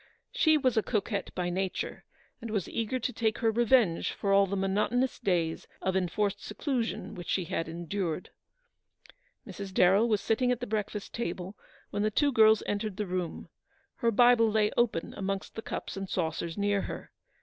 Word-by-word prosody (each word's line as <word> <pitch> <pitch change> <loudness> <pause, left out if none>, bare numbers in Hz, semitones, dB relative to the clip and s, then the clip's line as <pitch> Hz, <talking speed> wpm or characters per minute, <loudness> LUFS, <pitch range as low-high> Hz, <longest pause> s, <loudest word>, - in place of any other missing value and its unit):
She 320 -11 +4
was 255 -5 +1
a - - +5
coquette 205 -2 -2
by 175 -1 -1
nature, 190 +1 -3 0.4
and 230 - -6
was 205 -5 -1
eager 230 +3 -2
to 250 +1 -3
take 220 -1 0
her 225 -2 +2
revenge 235 -6 +3
for 200 -1 0
all 195 0 +5
the 200 - -2
monotonous 210 +7 0
days 175 -7 0
of 190 0 -1
enforced 190 +2 0
seclusion 235 +2 -2
which 175 -1 -8
she 185 - +1
had 165 0 -3
endured. 175 +1 -3 1.1
Mrs. 195 -1 -7
Darrell 190 +5 +4
was 210 -2 +3
sitting 245 +5 +1
at 245 - 0
the 245 - -3
breakfast 210 -2 -3
table 185 -3 -4 0.4
when 205 - -1
the 215 - +2
two 285 +7 +2
girls 220 -3 +5
entered 205 -1 -2
the 210 - -1
room. 180 -2 -4 0.5
Her 235 - +2
Bible 235 0 +5
lay 215 -1 +2
open 235 -8 0
amongst 195 0 -3
the 225 - -5
cups - - -5
and 195 -1 -5
saucers 165 0 -2
near 200 -1 +1
her. - - -7
205 Hz, 175 wpm, -29 LUFS, 190-230 Hz, 1.1 s, a